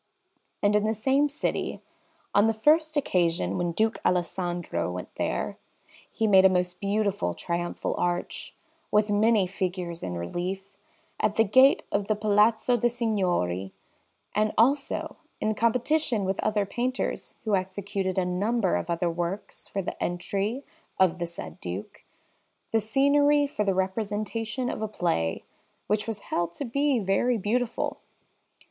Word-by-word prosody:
And 205 +1 +4
in 210 - +3
the 220 +1 +1
same 270 +7 +2
city, 285 - -2 0.5
on 205 +2 +5
the 225 - +1
first 310 +6 +3
occasion 170 - +1
when 175 -1 0
Duke 220 +6 0
Alessandro 175 - -1
went 90 0 -7
there, - - -2 0.5
he 225 - -1
made 190 -3 +6
a 190 - +8
most 180 -1 0
beautiful 200 - 0
triumphal 175 0 -2
arch, 175 0 -2 0.3
with 210 0 +2
many 215 -1 +4
figures 180 -2 -3
in 90 -1 -4
relief, 185 - -4 0.4
at 210 -1 +1
the 225 - +5
gate 260 +6 +5
of 200 0 0
the 215 - +2
Palazzo 215 +3 +3
de' 240 +1 +2
Signori; 180 - -1 0.6
and 215 +1 +2
also, 275 +5 +2 0.2
in 215 0 0
competition 235 0 +1
with 190 +1 -1
other 210 -1 +1
painters 250 +5 -3
who 215 -3 +2
executed 190 0 -2
a 185 - +2
number 195 +3 +1
of - - -5
other 170 +1 0
works 175 +4 -4
for 195 - -3
the - - -6
entry 200 +8 -2 0.3
of 180 -1 +3
the 170 - -2
said 80 - -9
Duke, 90 +3 -6 0.7
the 225 - +2
scenery 285 +6 +4
for 245 -7 -2
the 195 -2 +1
representation 215 +5 -2
of - - -3
a 220 - -1
play, 165 - -1 0.4
which 210 +1 0
was 215 -3 -3
held 170 -3 -2
to 285 - -4
be 280 +2 +1
very 220 +4 +1
beautiful. 230 +4 -1
205 Hz, 145 wpm, -27 LUFS, 180-225 Hz, 0.7 s, a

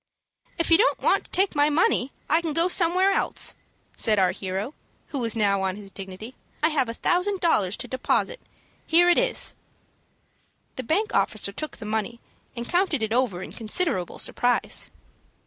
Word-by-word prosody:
"If 335 - 0
you 330 - +7
don't 485 - +3
want - - +1
to - - -10
take 385 +1 +2
the 290 -1 +2
money, 290 -4 +1 0.2
I 320 +3 +3
can 325 -3 -2
go 335 +3 +3
somewhere 365 +2 +3
else," - - 0 0.4
said 215 -2 +2
our 185 -2 +3
hero, 195 +7 -4 0.4
who 285 - -4
was 230 -2 +1
now 200 -3 +1
on 190 -1 -1
his 200 -1 -10
dignity. 195 +5 -9 0.3
"I 315 - +5
have 275 -6 0
a 230 - -5
thousand 370 +7 0
dollars 210 - +1
to 250 - -4
deposit. 265 - -1 0.5
Here 345 +2 +5
it - - +4
is." - - +2 1.2
The - - -4
bank 365 - -1
officer 205 -2 0
took 305 +9 -6
the 220 - -9
money, 220 +2 -3 0.4
and 235 0 -5
counted 350 - +1
it 220 0 -1
over 230 -8 0
in - - -9
considerable 220 - 0
surprise. 245 0 0
255 Hz, 175 wpm, -25 LUFS, 210-340 Hz, 1.2 s, you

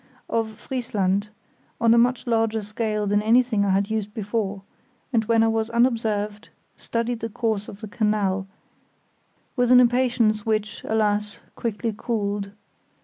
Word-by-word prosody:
] - - -41
of 220 -1 -7
Friesland, 205 -5 -1 0.5
on 230 0 +5
a - - +5
much 245 +1 +2
larger 225 -2 +1
scale 215 0 -2
than 205 +1 +2
anything 230 -1 +3
I 200 - +1
had 200 +2 +1
used 210 -1 -3
before, 205 -2 -2 0.5
and 225 -2 +3
when 225 0 +3
I - - +3
was 225 0 0
unobserved 225 -3 0 0.3
studied 235 0 -2
the 225 - -4
course 220 -2 -2
of 200 - -10
the 215 - -6
canal, 205 -3 0 1.1
with 245 -1 +2
an 250 - +9
impatience 240 -3 +3
which, 215 -1 -2
alas! 210 -1 0 0.2
quickly 225 0 -2
cooled. 205 -3 -2
220 Hz, 145 wpm, -24 LUFS, 205-230 Hz, 1.1 s, an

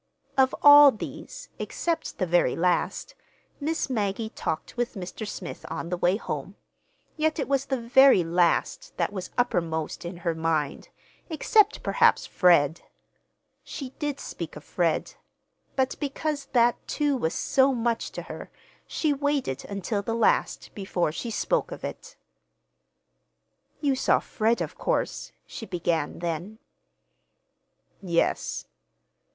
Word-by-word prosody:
Of 265 -1 +3
all 290 0 +10
these, 275 - -7
except 335 -1 -3
the 185 - 0
very 175 -7 +2
last, 180 - 0 0.5
Miss 315 +2 -1
Maggie 220 -3 -1
talked 160 - -4
with 245 0 -2
Mr. 195 +3 -6
Smith 180 -4 -7
on 165 - -4
the 180 - 0
way 180 +3 +2
home—yet 310 +6 -5
it 280 - -2
was 275 -1 +1
the 265 -2 -1
very 255 -3 +6
last 175 - 0
that - - 0
was 185 -2 -5
uppermost 165 -11 -1
in 175 +1 -6
her 170 - +2
mind, 160 -3 -1 0.4
except 420 +6 +3
perhaps, 465 -1 +3
Fred. 170 -4 +3 0.8
She 265 -3 -7
did 290 -2 -2
speak - - -7
of - - -10
Fred; - - -1 0.6
but 265 -1 +1
because 290 0 -3
that, 240 -3 +2
too, 290 -2 0
was 160 -11 -1
so 270 0 +3
much 235 -2 -1
to - - -5
her, - - -8 0.4
she 305 -3 0
waited 280 - -1
until 200 +1 -2
the 225 +3 -3
last 230 - +1
before 190 -5 -1
she 230 +9 -5
spoke 470 - 0
of - - -8
it. - - -7 1.7
"You 285 -3 +2
saw 260 - +3
Fred, 225 +1 0
of - - -5
course," - - -1
she 225 - -8
began 170 -4 -1
then. 170 +5 -4 1.4
"Yes." 170 -3 0
230 Hz, 130 wpm, -26 LUFS, 175-275 Hz, 1.7 s, all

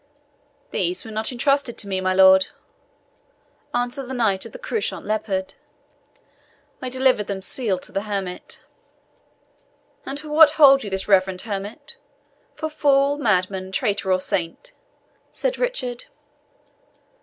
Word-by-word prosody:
"These 355 -6 -1
were 220 - -8
not 220 +2 -2
entrusted 275 0 0
to 205 - -4
me, 190 -1 -2
my 185 0 +1
lord," 190 0 +6 1.2
answered 245 +2 -2
the 260 - -5
Knight 210 -6 +1
of - - -15
the - - -9
Couchant 475 -3 -3
Leopard. 200 -3 -2 1.3
"I 255 - -3
delivered 255 -5 +2
them 195 -1 -4
sealed 195 -4 -1
to - - -10
the 195 - -1
hermit." 195 -3 -5 1.4
"And 275 +2 -5
for 305 0 -9
what 300 0 +7
hold 275 -3 +7
you 205 - -5
this 190 0 -3
reverend 190 -2 +3
hermit 220 +9 -6 0.6
for 315 +1 -3
fool, 285 -1 +2
madman, 190 -5 0
traitor, 200 -3 0
or 185 - +3
saint?" 185 - -3 0.6
said - - -2
Richard. 260 - -2
220 Hz, 130 wpm, -22 LUFS, 190-280 Hz, 1.4 s, what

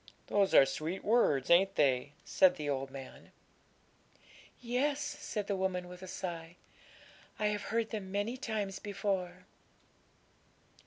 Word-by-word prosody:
'Those 200 -2 +2
are 135 - +9
sweet 155 +7 -4
words, 205 - +3
ain't 195 +3 +5
they?' 140 0 +2
said 185 -2 +4
the 150 -4 -5
old 135 -1 -1
man. 135 -1 -11 1.3
'Yes,' 260 +4 0
said 290 -8 -4
the 200 - -1
woman, 185 -1 -1
with 180 0 -11
a 185 - -8
sigh; 170 -2 -6 0.8
'I 215 - -1
have 210 0 -2
heard 225 0 -1
them 200 -4 -5
many 205 +5 -1
times 215 -6 -3
before.' 190 -3 -3
190 Hz, 135 wpm, -33 LUFS, 170-210 Hz, 1.3 s, are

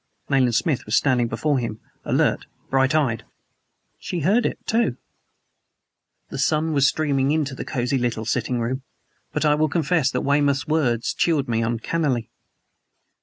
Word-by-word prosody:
Nayland 130 -4 +3
Smith 140 -2 0
was 105 - +1
standing 125 -4 +2
before 135 +5 0
him, 115 -3 -4 0.3
alert, - - +1 0.2
bright 135 +2 +3
eyed. 120 -7 +1 0.8
"She 175 - -4
heard 210 - +3
it, - - -4
too!" 220 - +1 1.3
The - - -5
sun 155 +3 +1
was 140 -1 +4
streaming 140 -3 +1
into 150 -2 0
the - - -5
cozy 125 +2 -1
little 120 -2 -2
sitting 120 +2 -1
room; 125 +3 -2 0.5
but - - -1
I 150 - +5
will 155 +1 +1
confess 160 -2 +1
that 125 -2 -2
Weymouth's 140 -1 +2
words 130 -7 0
chilled 155 -5 +1
me 115 -1 0
uncannily. 120 +2 -1
135 Hz, 150 wpm, -23 LUFS, 120-155 Hz, 1.3 s, I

